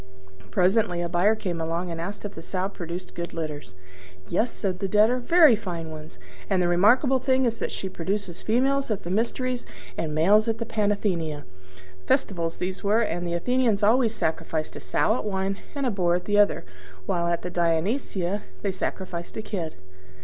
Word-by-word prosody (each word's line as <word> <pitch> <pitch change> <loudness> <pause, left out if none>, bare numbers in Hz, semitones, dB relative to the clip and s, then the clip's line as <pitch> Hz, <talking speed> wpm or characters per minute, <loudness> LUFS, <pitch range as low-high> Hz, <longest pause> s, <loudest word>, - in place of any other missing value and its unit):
Presently 185 -1 +2
a - - -1
buyer 185 +6 +3
came 175 -6 -3
along 170 +2 -2
and 165 0 -4
asked 200 +4 -5
if 205 - -5
the 165 - -8
Sow 185 +2 -2
produced 180 -2 -7
good 170 0 -5
litters. 150 - -5 0.5
"Yes," 220 +7 +1
said 185 -3 -3
the 195 - -1
Debtor, 215 +6 +4
"very 315 0 +6
fine 170 -6 -5
ones; 155 0 -10 0.3
and 190 -2 +2
the 180 - +2
remarkable 240 +10 +4
thing 260 0 +2
is 230 -1 0
that - - -2
she 190 - -4
produces 190 0 -3
females 270 +4 +1
at 210 -3 -2
the 175 - -4
Mysteries 245 +4 -1 0.4
and 155 -2 -2
males 205 +8 +4
at 225 -1 0
the 230 - -3
Panathenea." 200 -9 -1 0.6
(Festivals 170 - 0
these 185 +1 -4
were: 210 +3 +3
and 175 -5 -1
the 170 - -1
Athenians 230 +1 +1
always 225 +1 +4
sacrifice 160 0 -2
a - - -6
sow - - +1
at - - -4
one, 195 -1 -1 0.2
and 280 -1 -1
a 250 - +2
boar 175 -4 +2
at 180 - -3
the 205 0 +2
other; 205 - +3 0.4
while 170 - 0
at 170 0 0
the 180 - -4
Dionysia 180 - 0 0.2
they 200 - +1
sacrifice 185 -2 -4
a 220 - -3
kid.) 175 -7 -4
190 Hz, 185 wpm, -26 LUFS, 170-220 Hz, 0.6 s, very